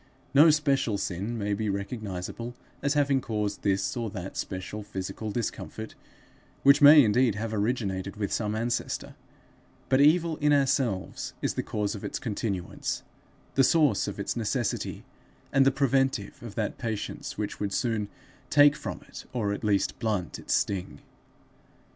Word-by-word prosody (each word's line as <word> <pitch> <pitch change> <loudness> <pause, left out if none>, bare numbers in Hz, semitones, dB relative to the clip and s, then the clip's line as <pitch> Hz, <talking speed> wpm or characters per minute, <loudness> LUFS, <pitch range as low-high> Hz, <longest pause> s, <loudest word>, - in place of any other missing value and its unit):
No 150 +4 +8
special 140 -8 +2
sin 100 +5 -3
may 105 -1 -1
be 105 +1 -1
recognizable 100 +2 -4 0.3
as 140 +1 +1
having 140 -2 +3
caused 105 -3 -2
this 100 +4 0
or 115 -2 -2
that 95 -2 -7
special 95 +3 -4
physical 105 +1 -5
discomfort 110 -2 -4 0.7
which 140 +2 +6
may 145 0 +10
indeed 115 0 +3
have 110 +1 -3
originated 100 -3 -1
with 105 -2 -2
some 105 -1 -1
ancestor; 120 +2 -2 0.8
but 130 +1 +4
evil 160 +2 +4
in 150 0 +3
ourselves 135 -8 0
is - - +1
the - - -1
cause 105 -2 -2
of 105 - -7
its - - -3
continuance, 100 -5 -3 0.5
the 135 - +4
source 145 -9 +3
of 100 - -5
its 100 - -2
necessity, 120 +1 -2 0.5
and 135 -1 +5
the - - +6
preventive 135 -5 0
of 115 -4 -9
that 110 -3 -2
patience 110 -3 -4
which 105 -1 -4
would 100 -1 -2
soon 110 -3 -1 0.4
take 145 0 +6
from - - -6
it, - - -10
or 105 -5 0
at 100 - -6
least 100 -2 +1
blunt 105 -7 -2
its - - 0
sting. 95 -3 -1
110 Hz, 155 wpm, -28 LUFS, 100-135 Hz, 0.8 s, may